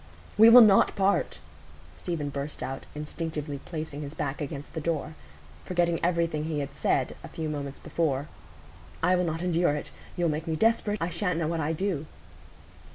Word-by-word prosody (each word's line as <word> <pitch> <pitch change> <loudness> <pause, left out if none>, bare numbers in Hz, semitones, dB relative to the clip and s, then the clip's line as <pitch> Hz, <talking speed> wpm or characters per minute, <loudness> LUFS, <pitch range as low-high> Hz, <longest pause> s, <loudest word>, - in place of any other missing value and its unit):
"We 220 +2 +8
will 245 +2 +11
not 200 -3 +5
part," 195 0 +1 0.6
Stephen 160 -5 -3
burst 140 +1 -5
out, 135 +1 -5
instinctively 150 -1 -4
placing 155 -3 -5
his 145 +1 -7
back 145 0 -3
against 145 0 -6
the 160 - -3
door, 160 -1 -2 0.5
forgetting 175 -2 0
everything 170 -3 +1
he 160 -1 -2
had 140 -1 -4
said - - 0
a - - -7
few 160 -1 -5
moments 145 -2 -4
before; 145 -4 -1 0.8
"I 180 +2 +4
will 180 0 +1
not 165 +1 -2
endure 175 -3 +2
it. 150 - -6 0.3
You'll 175 -1 +2
make 155 +2 -3
me 160 - 0
desperate; 215 +2 +2
I 165 - -1
sha'n't 180 -4 -1
know 165 -2 0
what 165 0 -1
I 160 +1 0
do." 165 -3 -2
160 Hz, 175 wpm, -28 LUFS, 150-175 Hz, 0.8 s, will